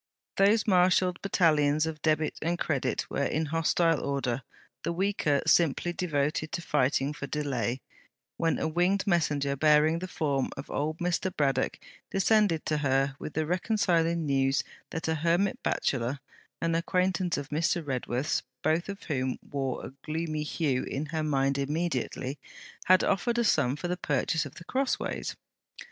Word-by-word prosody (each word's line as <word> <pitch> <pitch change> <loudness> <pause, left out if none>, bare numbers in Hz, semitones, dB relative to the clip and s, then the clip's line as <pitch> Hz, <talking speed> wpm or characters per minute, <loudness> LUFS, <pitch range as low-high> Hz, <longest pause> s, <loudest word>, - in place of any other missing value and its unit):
Those 205 +3 +4
marshalled 180 -2 +3
battalions 155 -5 +3
of 160 -2 -5
Debit 155 0 +1
and 170 +2 0
Credit 135 -6 -1
were 140 - -1
in 155 +3 0
hostile 165 +1 +1
order, 135 -3 -1 0.4
the - - -2
weaker 170 -6 +1
simply 165 +1 +3
devoted 155 -3 -1
to 170 - -2
fighting 135 +1 +1
for 140 -1 -6
delay, 130 -5 -2 0.5
when 165 -1 +1
a - - -1
winged 180 +4 +1
messenger 145 -7 +1
bearing 155 +3 +4
the 185 - -5
form 140 -7 -1
of 135 - -7
old 155 +2 -1
Mr. 180 +2 -1
Braddock 135 -3 +1 0.3
descended 195 -4 +2
to 155 -1 0
her 135 -1 +1
with 155 - -7
the 155 0 +1
reconciling 170 -2 +1
news 135 -1 +2 0.3
that 165 - -4
a 160 - +2
hermit 170 +5 +1
bachelor, 130 +1 -1 0.4
an 165 0 0
acquaintance 180 +1 +1
of 145 0 -5
Mr. 165 +2 0
Redworth's 130 +1 -1 0.2
both 160 +5 +1
of 200 0 -6
whom 130 -4 -1
wore 135 -3 -2
a - - -9
gloomy 155 0 -2
hue 150 -3 0
in 140 +3 -3
her 160 - 0
mind 140 -2 +1
immediately 140 -2 -2 0.5
had 185 0 +5
offered 200 +5 +1
a 235 - +3
sum 140 - +2
for 165 +4 -4
the 180 0 -2
purchase 150 +1 0
of 140 - -15
The - - -10
Crossways. 265 +5 -2
155 Hz, 155 wpm, -28 LUFS, 140-175 Hz, 0.5 s, had